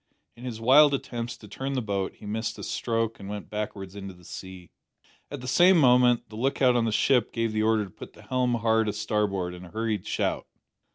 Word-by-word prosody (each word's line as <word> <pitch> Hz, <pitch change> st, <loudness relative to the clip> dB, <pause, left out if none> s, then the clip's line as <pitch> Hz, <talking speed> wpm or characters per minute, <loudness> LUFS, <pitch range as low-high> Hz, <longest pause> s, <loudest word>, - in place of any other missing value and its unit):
In 120 Hz, -, -11 dB
his 115 Hz, -3 st, -5 dB
wild 140 Hz, +5 st, +6 dB
attempts 120 Hz, -3 st, -5 dB
to 105 Hz, -, -13 dB
turn 135 Hz, +7 st, -4 dB
the 135 Hz, -, 0 dB
boat 100 Hz, -2 st, -2 dB
he -, -, -14 dB
missed 110 Hz, +2 st, -3 dB
a -, -, -8 dB
stroke 115 Hz, -1 st, -2 dB
and 100 Hz, 0 st, -8 dB
went 105 Hz, -1 st, -7 dB
backwards 105 Hz, -2 st, -5 dB
into 100 Hz, -2 st, -8 dB
the 90 Hz, 0 st, -19 dB
sea. 95 Hz, -1 st, -10 dB, 0.6 s
At 145 Hz, -3 st, -7 dB
the 125 Hz, -, -7 dB
same 175 Hz, +8 st, +5 dB
moment 125 Hz, -4 st, +4 dB
the 110 Hz, -, -11 dB
lookout 130 Hz, 0 st, +2 dB
on 120 Hz, -1 st, +2 dB
the 115 Hz, -, 0 dB
ship 125 Hz, +1 st, +2 dB
gave 115 Hz, -1 st, -1 dB
the 110 Hz, -, 0 dB
order 110 Hz, -1 st, +2 dB
to 95 Hz, -, -13 dB
put -, -, -11 dB
the -, -, -16 dB
helm 125 Hz, -1 st, 0 dB
hard 110 Hz, -1 st, +2 dB
a -, -, -2 dB
starboard 100 Hz, -4 st, -1 dB
in 90 Hz, 0 st, -10 dB
a -, -, -12 dB
hurried 110 Hz, -2 st, -2 dB
shout. -, -, -1 dB
115 Hz, 225 wpm, -27 LUFS, 105-125 Hz, 0.6 s, wild